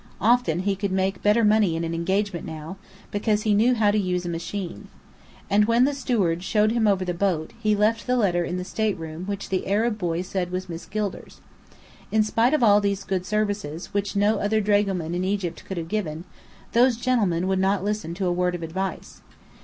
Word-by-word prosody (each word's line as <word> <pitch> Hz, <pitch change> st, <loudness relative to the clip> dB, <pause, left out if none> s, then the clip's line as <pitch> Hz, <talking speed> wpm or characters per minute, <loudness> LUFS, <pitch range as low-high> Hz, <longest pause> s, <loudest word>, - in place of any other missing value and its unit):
Often 215 Hz, -7 st, +2 dB
he 195 Hz, +1 st, 0 dB
could 195 Hz, 0 st, -3 dB
make 190 Hz, 0 st, 0 dB
better 210 Hz, +3 st, +3 dB
money 210 Hz, -5 st, +3 dB
in 165 Hz, -, -2 dB
an 165 Hz, 0 st, -2 dB
engagement 190 Hz, +2 st, -1 dB
now, 160 Hz, +4 st, -7 dB, 0.3 s
because 210 Hz, +1 st, 0 dB
he 215 Hz, -, +2 dB
knew 235 Hz, +5 st, +4 dB
how 210 Hz, -3 st, +3 dB
to 210 Hz, -, +1 dB
use 180 Hz, -2 st, -1 dB
a -, -, -2 dB
machine. 170 Hz, -, -5 dB, 0.6 s
And 210 Hz, +1 st, +4 dB
when 235 Hz, +3 st, +4 dB
the 285 Hz, -, +1 dB
steward 205 Hz, -11 st, 0 dB
showed 210 Hz, +3 st, +2 dB
him 230 Hz, -2 st, +2 dB
over 190 Hz, -2 st, +2 dB
the 180 Hz, -, -1 dB
boat, 175 Hz, -1 st, -1 dB
he 215 Hz, -1 st, +2 dB
left 215 Hz, +4 st, +1 dB
the 250 Hz, 0 st, +2 dB
letter 180 Hz, -6 st, +2 dB
in 175 Hz, +1 st, -3 dB
the 180 Hz, -, -3 dB
stateroom 180 Hz, -4 st, -3 dB
which 200 Hz, -1 st, -4 dB
the 190 Hz, -1 st, -1 dB
Arab 215 Hz, +3 st, +1 dB
boy 175 Hz, -1 st, -1 dB
said 185 Hz, -1 st, -3 dB
was 185 Hz, +1 st, -4 dB
Miss 170 Hz, -1 st, -7 dB
Gilder's. 210 Hz, -1 st, -4 dB, 0.7 s
In 220 Hz, 0 st, +4 dB
spite 230 Hz, +6 st, +2 dB
of 300 Hz, -, +1 dB
all 205 Hz, -2 st, +6 dB
these 200 Hz, -1 st, -1 dB
good 185 Hz, -1 st, -2 dB
services, 205 Hz, -6 st, -2 dB
which 200 Hz, 0 st, -1 dB
no 205 Hz, +1 st, +2 dB
other 215 Hz, +2 st, +1 dB
dragoman 200 Hz, -5 st, +1 dB
in 180 Hz, +1 st, -1 dB
Egypt 190 Hz, -3 st, -2 dB
could 190 Hz, -, -6 dB
have 165 Hz, -1 st, -4 dB
given, 170 Hz, -5 st, -3 dB, 0.5 s
those 240 Hz, +1 st, +4 dB
gentlemen 210 Hz, -8 st, +1 dB
would 190 Hz, 0 st, +1 dB
not 190 Hz, 0 st, +1 dB
listen 205 Hz, -5 st, -2 dB
to 190 Hz, +1 st, -2 dB
a 175 Hz, -, +1 dB
word 180 Hz, 0 st, 0 dB
of 170 Hz, -, -6 dB
advice. 185 Hz, +3 st, -5 dB
195 Hz, 210 wpm, -24 LUFS, 180-215 Hz, 0.7 s, all